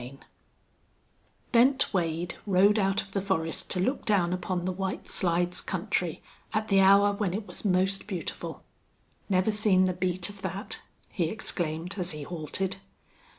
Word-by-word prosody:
CHAPTER 130 +3 -9
V - - -22 1.2
Bent 260 +2 +4
Wade 170 -1 -1
rode 200 +3 +4
out 195 -1 +1
of 195 - -17
the 195 - -1
forest 165 -5 -1
to 185 - +1
look 255 +10 0
down 185 -5 +2
upon 180 -1 -2
the 185 - 0
White 190 +1 -4
Slides 175 0 0
country 180 -3 -2 0.3
at 215 0 -1
the 195 -1 +5
hour 200 +1 +6
when 200 -3 -1
it 210 0 -4
was - - -7
most 190 0 +1
beautiful. 185 -5 -5 0.7
"Never 185 +2 +2
seen 205 -3 +4
the 185 - +1
beat 180 0 0
of 205 -1 -11
that!" 190 +1 -4 0.3
he 175 - -1
exclaimed, 175 -2 -2
as 175 -2 0
he 150 -1 -6
halted. 180 +4 -3
185 Hz, 160 wpm, -28 LUFS, 175-200 Hz, 1.2 s, hour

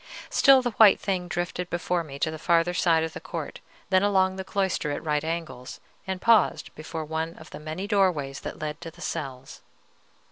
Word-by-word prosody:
Still 270 -2 +6
the 245 - -1
white 215 -2 +6
thing 185 -3 -2
drifted 175 +1 -3
before 175 0 -1
me 140 -3 -9
to 155 +2 0
the 160 - -7
farther 170 +2 +2
side 165 -2 +3
of 160 0 -4
the - - -6
court, - - -6 0.3
then 185 0 +5
along 190 -2 +2
the 190 - -5
cloister 190 -5 -1
at 145 - -3
right 150 -1 0
angles, 160 -6 -5 0.3
and 190 -1 -3
paused 225 0 +3
before 155 +1 -6
one 160 +2 -3
of 160 - -14
the - - -8
many 155 +5 -5
doorways 180 -10 +1
that - - -7
led 155 +1 -5
to 170 - -6
the 165 - -18
cells. 135 -5 -6
170 Hz, 200 wpm, -26 LUFS, 155-190 Hz, 0.3 s, Still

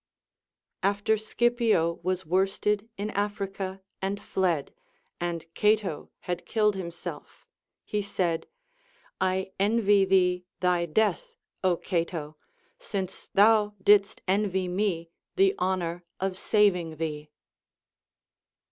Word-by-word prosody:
* - - -62 0.2
After 220 +2 +2
Scipio 220 -6 +1
was 185 +1 -1
worsted 195 +4 +1
in 210 +2 -3
Africa 195 -2 -3 0.2
and 195 +1 -1
tied, 175 -7 -1 0.5
and 170 -1 -3
Cato 210 -7 +1
had 175 -1 -3
killed 210 -2 +2
himself, 170 -3 -7 0.4
he 210 - -1
said: 180 -4 -1 0.7
I 190 0 0
envy 205 -1 +4
thee 180 -1 +3
thy 180 -1 +2
death, 220 - 0 0.3
Ο 180 -2 +3
Cato! 165 -4 -2 0.4
since 195 - -4
thou 210 0 +4
didst 200 +1 +4
envy 190 -1 +1
me 180 -3 -1 0.2
the 390 0 +4
honor 175 -2 -1 0.2
of 190 0 -1
saving 185 -5 +2
thee. 150 -1 -4
190 Hz, 105 wpm, -27 LUFS, 175-210 Hz, 0.7 s, envy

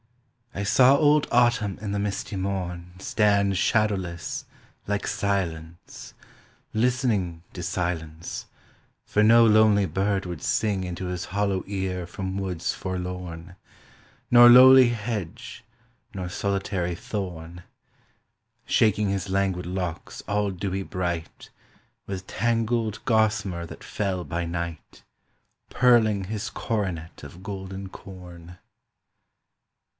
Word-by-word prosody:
I 100 - -3
saw 130 +6 +5
old 150 0 +4
Autumn 120 -5 +2
in 105 -1 -5
the 100 - -1
misty 100 +1 -3
morn 90 -2 -4
Stand 100 -1 +2
shadowless 95 -5 -1 0.4
like 100 0 -1
Silence, 85 -4 -4 0.6
listening 110 -8 0
To 90 - -6
silence, 85 -2 -4 0.6
for 105 - +1
no 115 +2 +7
lonely 110 -2 +5
bird 95 +3 -1
would 85 -4 -6
sing 105 -3 0
Into 90 0 -5
his 90 0 -4
hollow 100 -1 -1
ear 95 -2 -3
from 95 +2 -5
woods 90 -3 -2
forlorn, 90 -2 -6 0.8
Nor 120 0 +9
lowly 130 0 +9
hedge 110 -6 -5 0.5
nor 90 -2 -4
solitary 95 -2 -2
thorn; 90 -3 -6 1.0
Shaking 105 -2 +2
his 95 -1 -2
languid 95 -2 0
locks 90 -3 -4
all 105 0 0
dewy 95 +1 -3
bright 85 -3 -4 0.6
With 95 -1 -6
tangled 115 -2 -1
gossamer 105 -7 +1
that - - -11
fell 95 -3 -2
by 85 0 -3
night, 85 -1 -6 0.7
Pearling 110 -6 +3
his 105 +2 -4
coronet 90 -7 -4
of 80 +6 -11
golden 95 -1 -6
corn. 90 -2 -12
95 Hz, 110 wpm, -25 LUFS, 90-105 Hz, 1.0 s, Nor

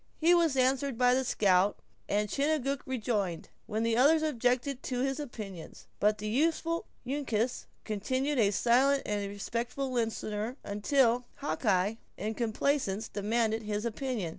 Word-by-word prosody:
He 335 +2 +4
was 330 -6 +3
answered 260 0 +2
by 250 0 +4
the 260 +1 +2
scout; 200 -4 +3 0.3
and 210 +1 +1
Chingachgook 280 +2 0
rejoined, 215 -9 -2 0.2
when 220 +1 -1
the 230 0 +2
other 285 +7 +6
objected 250 0 0
to 250 -1 -2
his 270 +2 -1
opinions. 210 - -8
But 210 +1 +3
the 215 0 -5
youthful 330 +7 0 0.2
Uncas 250 -3 -1 0.2
continued 260 +7 -1
a 205 -3 +4
silent 255 +7 +3
and 205 -1 -2
respectful 235 +6 -3
listener, 225 0 -2
until 240 +4 +2
Hawkeye, 210 -7 0 0.2
in 215 +3 -2
complaisance, 225 -2 -1
demanded 220 +2 0
his 210 0 -3
opinion. 235 -5 -2
235 Hz, 140 wpm, -30 LUFS, 210-270 Hz, 0.3 s, other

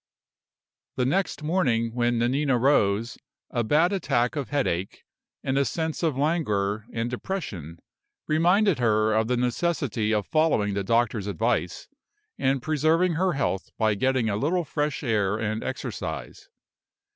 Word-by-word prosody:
The 125 - 0
next 165 +1 0
morning, 125 -9 +1
when 120 0 +1
Nanina 130 +3 +1
rose, 115 -4 +2 0.3
a 120 - 0
bad 160 - +3
attack 125 -10 0
of 145 -3 -3
headache, 100 - -2 0.4
and 135 +1 +1
a - - +4
sense 160 +5 -2
of 160 -6 0
languor 110 -9 0
and 115 0 -2
depression, 120 - -5 0.5
reminded 175 +3 +3
her 110 -2 +2
of 110 0 +2
the 125 0 +1
necessity 125 -3 0
of 105 -2 +1
following 155 -11 +2
the 100 0 -1
doctor's 115 -1 +1
advice, 105 -3 -1 0.5
and 130 -1 +1
preserving 160 +4 +2
her 180 +3 +1
health 135 - -2
by 110 -1 +2
getting 130 +3 +1
a 100 -2 0
little 170 +9 0
fresh 150 0 -2
air 105 -5 +1
and 110 0 -2
exercise. 130 -4 -5
125 Hz, 140 wpm, -25 LUFS, 110-155 Hz, 0.5 s, a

